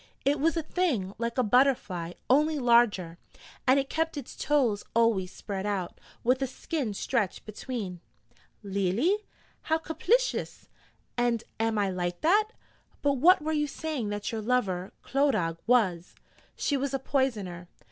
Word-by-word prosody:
'It 285 +1 +2
was 330 +4 +2
a 325 - 0
thing 280 - -1
like 235 +1 -2
a 255 - +3
butterfly, 210 -8 +2
only 300 +4 +3
larger, 235 -9 +3 0.5
and 260 +2 +6
it 275 - -2
kept 320 +1 -1
its 275 - -7
toes 250 -9 +1
always 220 -6 +2
spread 195 -2 -5
out, 200 -4 -3 0.2
with 255 +3 +2
a 270 - +1
skin 270 -2 -3
stretched 205 -1 -1
between.' 215 -4 -5 0.6
'Leally? 200 - +1 0.5
How 320 - +4
caplicious! 435 +11 0 0.5
And 235 -2 +1 0.2
am 225 -1 +1
I 200 -2 +1
like 175 -1 -3
that? 410 +7 +4 0.6
but 285 -1 +2
what 355 +3 +6
were 315 - -1
you 295 -1 +1
saying 285 -6 -3
that 205 0 -3
your 225 -1 -3
lover, 200 -6 0
Clodagh, 215 - +1
was?' 190 -8 +2 0.4
'She 285 - 0
was 275 0 -1
a - - +2
Poisoner.' 215 -11 -1
240 Hz, 145 wpm, -28 LUFS, 200-285 Hz, 0.6 s, and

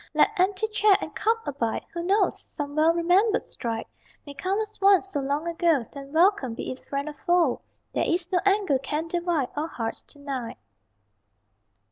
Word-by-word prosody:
Let - - +5
empty 380 +3 +2
chair 425 -2 +4
and - - -6
cup 455 +1 0
abide! 240 -6 -2
Who 340 - -3
knows? 390 +5 +1
Some 290 -1 -6
well 315 +2 +5
remembered 360 +6 +2
stride 225 -1 -4 0.4
May 285 - -8
come 375 +8 -1
as 430 -2 -5
once 390 -1 +5
so 295 - -2
long 285 +4 -2
ago 330 -5 +2
Then 275 -1 -9
welcome, 325 - +3
be - - -4
it 255 - -7
friend 280 +1 -4
or 300 - -5
foe! 345 -3 +1 0.3
There - - 0
is 345 0 -1
no 360 - +3
anger 390 -8 +2
can 300 +4 -3
divide 340 -5 -1
Our 300 +2 -1
hearts 225 -8 -4
to - - -14
night. 270 -5 -5
330 Hz, 180 wpm, -26 LUFS, 280-385 Hz, 0.4 s, Let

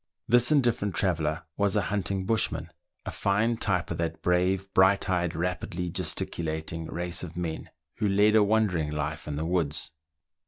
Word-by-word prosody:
This 120 +3 +4
indifferent 120 - +2
traveller 80 -3 0
was 100 -1 +1
a 105 - +3
hunting 95 -1 -1
bushman, 110 +2 -1 0.3
a - - -3
fine 105 +4 +1
type 95 -6 0
of 85 - -2
that 80 -1 -3
brave, 90 +2 +1
bright 95 +1 +4
eyed, 90 -3 0
rapidly 90 +1 -2
gesticulating 80 -3 -3
race 85 +1 -2
of 85 -1 -7
men, 85 -2 -4 0.3
who 105 - +1
lead 105 +2 +4
a 110 - +7
wandering 100 -7 +2
life 75 +1 -4
in 75 - -3
the 75 +2 -2
woods. 80 -5 -1
90 Hz, 160 wpm, -27 LUFS, 80-100 Hz, 0.3 s, a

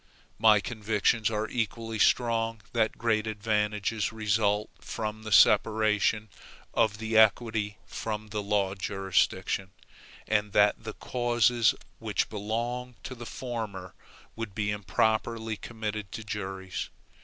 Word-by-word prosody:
My 110 -1 +6
convictions 110 0 +1
are 110 0 -1
equally 115 -1 -3
strong 115 -2 +2
that 115 -2 +1
great 110 -2 +1
advantages 105 0 0
result 105 -1 +1
from 110 -1 -4
the 110 0 -7
separation 110 0 +4 0.4
of 110 -3 +2
the 110 0 -3
equity 110 -1 +3
from 110 -1 -5
the 105 0 -2
law 100 -2 +1
jurisdiction, 95 -1 0 0.6
and 105 -1 +1
that 105 +1 +4
the 110 - -4
causes 120 -1 +2 0.2
which - - -1
belong 120 +4 -3
to 130 - -6
the 120 -2 -9
former 110 -7 -5 0.4
would 115 -4 -6
be 105 -1 0
improperly 110 +3 0
committed 105 -3 -5
to 115 - -5
juries. 95 -3 -5
110 Hz, 120 wpm, -28 LUFS, 105-115 Hz, 0.6 s, My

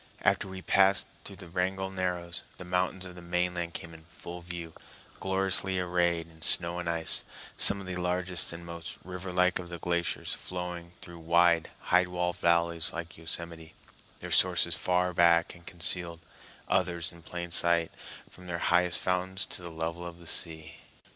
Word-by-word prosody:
After - - +2
we 95 - -8
had 95 - -10
passed 95 0 +4 0.2
through 100 - -7
the 95 -2 -11
Wrangell 95 +2 -2
Narrows, 90 -2 -3 0.2
the 90 - -9
mountains 90 +1 -1
of 90 - -9
the 90 - -11
mainland 90 0 -2
came 85 0 -7
in 80 -1 -14
full 85 +1 -10
view, 85 -2 -7 0.5
gloriously 95 0 +1
arrayed 85 -2 0
in 80 -1 -19
snow 85 +2 +3
and 85 -1 -3
ice, 85 -1 +2 0.3
some 100 - +8
of 100 - -8
the 90 -1 -4
largest 90 0 -1
and 85 0 -9
most 85 -1 -7
river 90 0 -7
like 90 0 +2
of 90 -1 -8
the 85 - -6
glaciers 85 +1 -2
flowing 90 -1 -6
through 85 -2 -10
wide, 85 0 +3 0.2
high 90 0 +5
walled 90 0 -2
valleys 85 -1 +2
like 85 0 -7
Yosemite, 80 0 -6 0.5
their - - -7
sources - - +4
far 90 0 0
back 85 0 +4
and 85 -1 -17
concealed, 85 -1 -1 0.5
others 90 -2 0
in 85 -1 -15
plain 85 +1 -7
sight, 85 -1 +4 0.4
from 90 0 -14
their 85 -1 -3 0.2
highest 90 0 +5
fountains 95 +1 -1
to - - -6
the 85 - -7
level 80 +1 -4
of 85 -1 -8
the 85 - -15
sea. 80 -1 +2
85 Hz, 175 wpm, -29 LUFS, 85-90 Hz, 0.5 s, some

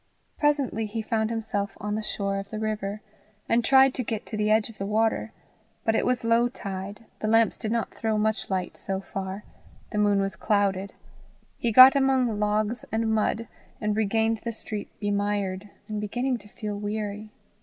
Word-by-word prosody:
Presently 280 -7 +1
he 220 +1 -4
found 220 -1 0
himself 210 -3 -3
on 210 +1 -3
the 215 - -1
shore 200 -2 -2
of 195 0 -8
the 215 - -5
river, 215 -1 -3 0.4
and 235 +1 +3
tried 265 +1 +6
to 255 - -2
get 220 -2 -3
to - - -6
the 210 0 +1
edge 215 0 +3
of 225 -3 -14
the 195 - -2
water; 220 +2 +1 0.5
but 225 - +3
it - - +1
was 250 -1 +1
low 230 +1 +4
tide, 200 -1 -6
the 215 - -2
lamps 225 +1 +4
did 215 - -4
not 230 -1 -1
throw 220 -1 -1
much 220 +1 0
light 185 -2 -2
so 195 0 -3
far, 195 +1 -5 0.5
the 210 - -1
moon 205 -1 +3
was 195 0 -1
clouded, 200 -2 0 0.6
he 235 - -1
got 255 +4 +10
among 260 -5 +2
logs 210 +2 0
and 220 0 +1
mud, 220 +1 0 0.3
and 210 -1 0
regained 220 +1 +1
the 235 - -2
street 210 -1 -5
bemired, 205 -1 -1 0.2
and 215 -1 -3
beginning 245 +4 -1
to 210 - -16
feel 210 0 -5
weary. 210 0 -4
215 Hz, 185 wpm, -26 LUFS, 205-225 Hz, 0.6 s, got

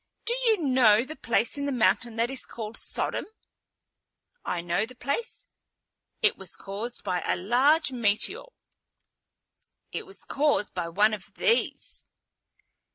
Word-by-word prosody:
Do 470 - +2
you 430 -7 +3
know 250 -5 +5
the 310 - -8
place 235 +2 0
in 285 - -1
the - - 0
mountain 235 -1 +2
that 230 +2 0
is 270 - -1
called 220 -1 -7
Sodom?" - - -1 1.2
"I 180 - -2
know 175 +2 0
the 250 +3 -8
place. 280 - -3 0.8
It 430 - +4
was 190 - -3
caused 210 +5 -6
by 180 -3 -1
a - - 0
large 265 - +3
meteor." 240 - 0 1.5
"It - - -5
was 390 - -6
caused 285 -7 +1
by 175 -2 -3
one 205 +5 +3
of 205 -3 -7
these." 465 0 0
235 Hz, 140 wpm, -27 LUFS, 210-285 Hz, 1.5 s, know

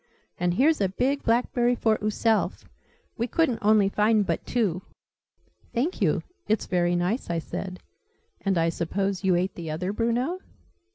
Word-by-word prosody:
And 175 0 +1
here's 295 - +3
a 195 - +2
big 265 +8 0
blackberry 240 +1 +2
for 220 -2 +1
ooself! 215 +1 0 0.5
We 235 - 0
couldn't 260 -3 +1
only 210 -1 +4
find 210 +1 +2
but - - -1
two!" 200 -8 0 0.9
"Thank 285 +10 -1
you: - - +2 0.2
it's 215 -1 +1
very 175 -1 +1
nice," 180 +8 -1
I 170 - 0
said. 180 +3 -5 0.6
"And 195 -2 +1
I 165 0 +3
suppose 195 +4 -2
you 190 -2 +3
ate 185 +2 0
the 165 -2 -7
other, 180 +5 -2
Bruno?" 240 - 0
210 Hz, 155 wpm, -26 LUFS, 180-235 Hz, 0.9 s, only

